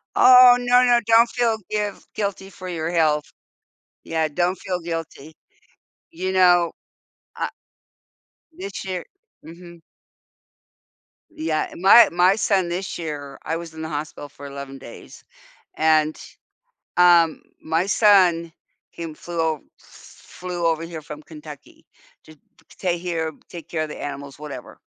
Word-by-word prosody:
Oh, 250 Hz, -1 st, +8 dB
no 245 Hz, +1 st, +4 dB
no, 240 Hz, -1 st, +5 dB
don't 230 Hz, +1 st, +5 dB
feel 235 Hz, -3 st, 0 dB
giv 210 Hz, -1 st, -3 dB
guilty 200 Hz, -2 st, -3 dB
for 185 Hz, -1 st, -10 dB
your 165 Hz, -2 st, -3 dB
health. 155 Hz, -3 st, +2 dB, 0.8 s
Yeah, 160 Hz, -1 st, -1 dB
don't 175 Hz, +5 st, 0 dB
feel 180 Hz, -1 st, -4 dB
guilty. 165 Hz, -2 st, -6 dB, 0.8 s
You 185 Hz, +3 st, -3 dB
know, 175 Hz, -2 st, +4 dB, 0.7 s
uh, -, -, -2 dB, 1.1 s
this 370 Hz, -, -7 dB
year 185 Hz, -2 st, -4 dB, 0.4 s
mhm. 170 Hz, 0 st, -13 dB, 1.5 s
Yeah, 155 Hz, -1 st, -2 dB
my 200 Hz, +5 st, +7 dB
my 180 Hz, +3 st, +4 dB
son 190 Hz, -5 st, +1 dB
this 185 Hz, +2 st, -4 dB
year 145 Hz, -4 st, -6 dB
I 160 Hz, -, -2 dB
was 165 Hz, -1 st, -9 dB
in 160 Hz, -, -9 dB
the 160 Hz, -, -5 dB
hospital 145 Hz, -1 st, -6 dB
for 140 Hz, 0 st, -13 dB
11 140 Hz, -1 st, -8 dB
days 130 Hz, -, -13 dB, 0.6 s
and, 155 Hz, -1 st, +3 dB, 0.8 s
um, 170 Hz, -2 st, +5 dB, 0.2 s
my 165 Hz, +3 st, 0 dB
son, 180 Hz, -6 st, +4 dB, 0.4 s
he 165 Hz, -2 st, -7 dB
flew 170 Hz, +1 st, -7 dB
o 160 Hz, -2 st, -1 dB, 0.2 s
flew 180 Hz, -1 st, -8 dB
over 165 Hz, 0 st, 0 dB
here 165 Hz, -1 st, -7 dB
from 150 Hz, 0 st, -10 dB
Kentucky 150 Hz, -3 st, -13 dB, 0.4 s
to 155 Hz, -, -14 dB
to -, -, -34 dB, 0.3 s
stay 180 Hz, -2 st, -2 dB
here, 170 Hz, -2 st, -3 dB, 0.2 s
take 170 Hz, -2 st, -10 dB
care 160 Hz, -2 st, -2 dB
of 155 Hz, -, -6 dB
the -, -, -8 dB
animals, 140 Hz, -1 st, -7 dB
whatever. 145 Hz, -4 st, -9 dB
170 Hz, 135 wpm, -22 LUFS, 155-185 Hz, 1.5 s, Oh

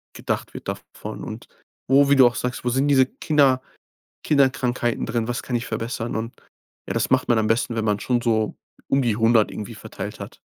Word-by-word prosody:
gedacht -, -, -3 dB
wird -, -, -9 dB
davon -, -, -7 dB
und -, -, -8 dB, 0.4 s
wo, 140 Hz, +2 st, +5 dB
wie 140 Hz, -, +6 dB
du 130 Hz, -2 st, +7 dB
auch 120 Hz, -, -1 dB
sagst, 125 Hz, 0 st, -3 dB
wo -, -, +2 dB
sind 135 Hz, +3 st, +1 dB
diese 135 Hz, -2 st, +5 dB
Kinder 135 Hz, -2 st, +2 dB, 0.6 s
Kinderkrankheiten 130 Hz, -4 st, +1 dB
drin? 115 Hz, -1 st, -2 dB
Was 120 Hz, 0 st, -3 dB
kann 125 Hz, -, -3 dB
ich 120 Hz, -, -1 dB
verbessern? 115 Hz, +1 st, -3 dB
Und 115 Hz, +2 st, -3 dB, 0.5 s
ja, -, -, -2 dB
das -, -, 0 dB
macht -, -, +2 dB
man 120 Hz, -, +4 dB
am 110 Hz, -1 st, +1 dB
besten, 115 Hz, +1 st, 0 dB
wenn 110 Hz, -1 st, -1 dB
man 105 Hz, -1 st, +1 dB
schon 120 Hz, +1 st, 0 dB
so 110 Hz, -2 st, 0 dB, 0.3 s
um 135 Hz, -, +2 dB
die 120 Hz, -4 st, +1 dB
100 115 Hz, -1 st, +4 dB
irgendwie 110 Hz, +2 st, -7 dB
verteilt 105 Hz, -, -7 dB
hat. -, -, -9 dB
120 Hz, 205 wpm, -23 LUFS, 115-130 Hz, 0.6 s, du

